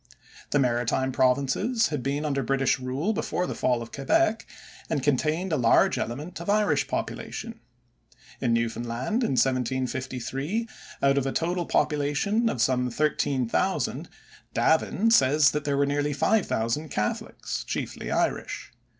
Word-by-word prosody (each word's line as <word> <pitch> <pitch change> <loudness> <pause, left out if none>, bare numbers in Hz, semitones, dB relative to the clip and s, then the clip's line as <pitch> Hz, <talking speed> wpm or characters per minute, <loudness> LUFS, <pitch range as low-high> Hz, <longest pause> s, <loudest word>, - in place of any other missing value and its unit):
The - - +2
maritime 125 0 +1
Provinces 135 - +2
had 150 -4 -2
been 140 +3 -2
under 140 -2 0
British 135 +1 +1
rule 135 +11 -1
before 180 -3 -1
the - - -3
fall 120 -2 0
of 115 - -12
Quebec 225 - +1 0.4
and 145 -5 -1
contained 155 +6 +1
a - - +2
large 115 -3 +4
element 150 +9 -5
of 170 - -5
Irish 210 0 +2
population. 230 -1 -5 0.8
In 120 - 0
Newfoundland 115 - -1
in 185 - 0
1753 130 - -1 0.4
out 140 0 +4
of 135 - -2
a - - 0
total 175 +3 -1
population 150 +11 +1
of 120 - 0
some 125 -1 +1
thirteen 135 -1 0
thousand, - - -1 0.5
Davin 195 +7 +2
says 145 - +5
that 150 0 -3
there 140 -1 0
were 140 - +3
nearly 145 +1 0
five 210 +8 +2
thousand 115 +8 -1
Catholics, 105 -4 -3
chiefly - - -4
Irish. - - -1
140 Hz, 140 wpm, -26 LUFS, 130-165 Hz, 0.8 s, says